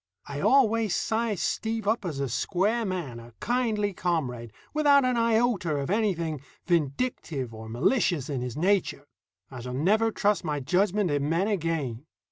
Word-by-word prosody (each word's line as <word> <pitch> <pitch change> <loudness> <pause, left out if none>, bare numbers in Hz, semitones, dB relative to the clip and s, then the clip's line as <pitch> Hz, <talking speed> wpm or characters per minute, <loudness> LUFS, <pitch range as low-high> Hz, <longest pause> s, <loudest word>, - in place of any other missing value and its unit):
I 140 0 -6
always 230 - +3
sized 220 -3 -1
Steve 225 -2 -2
up 220 -1 +1
as 155 -6 -3
a 140 - 0
square 205 - 0
man, 170 - -4
a 115 0 -13
kindly 220 -4 0
comrade, 130 -11 -2 0.2
without 290 -3 +5
an 255 -1 +1
iota 230 -7 +2
of 140 +3 -2
anything 170 - 0 0.2
vindictive 150 - -1
or 110 0 -9
malicious 150 - +1
in 135 -4 -3
his 125 0 -5
nature. 185 -4 +1 0.5
I 130 - -7
shall 125 +1 -5
never 210 +11 +3
trust 205 -1 +1
my 150 -3 -1
judgment 190 +5 +1
in 145 0 0
men 170 +5 +1
again. 160 - -2
180 Hz, 155 wpm, -27 LUFS, 140-220 Hz, 0.5 s, without